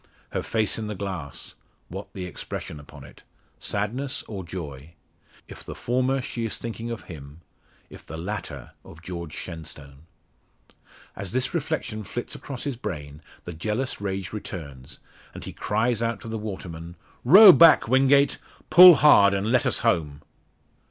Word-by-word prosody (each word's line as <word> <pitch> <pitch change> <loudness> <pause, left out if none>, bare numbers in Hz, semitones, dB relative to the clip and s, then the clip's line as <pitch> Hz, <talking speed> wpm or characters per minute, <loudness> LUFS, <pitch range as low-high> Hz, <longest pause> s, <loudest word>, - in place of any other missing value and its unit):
Her - - -2
face 110 -1 -1
in 110 - -4
the 105 - -5
glass 90 -8 -6 0.3
what - - -8
the 95 - -6
expression 80 -3 -7
upon 75 - -13
it? - - -15 0.4
Sadness, 120 +7 -3
or 100 -4 -6
joy? 80 -4 -8 0.5
If - - -11
the - - -8
former, 130 +2 0
she 120 - -5
is 115 - -3
thinking 115 0 -6
of 115 -1 -6
him; 75 -1 -11 0.5
if - - -14
the 80 - -7
latter 95 +4 -6
of 80 +1 -15
George 85 -3 -7
Shenstone. 75 -3 -10 1.1
As 100 0 -6
this 130 +1 -1
reflection 155 -9 -3
flits 120 +4 -6
across 135 -3 -7
his 140 -4 -4
brain, 75 - -7 0.2
the 90 - -7
jealous 105 +9 -3
rage 95 -1 -4
returns, 70 -11 -8 0.4
and - - -8
he - - -8
cries 110 +2 -1
out 115 -2 -1
to - - -9
the 110 0 -4
waterman 85 -5 -7 0.3
"Row 190 - +10
back, 165 -8 +6
Wingate! 135 +3 +3 0.3
Pull 180 0 +11
hard, 100 -10 +6
and 100 +3 -1
let 125 - +2
us - - +1
home!" 75 -4 0
105 Hz, 155 wpm, -25 LUFS, 85-120 Hz, 1.1 s, Pull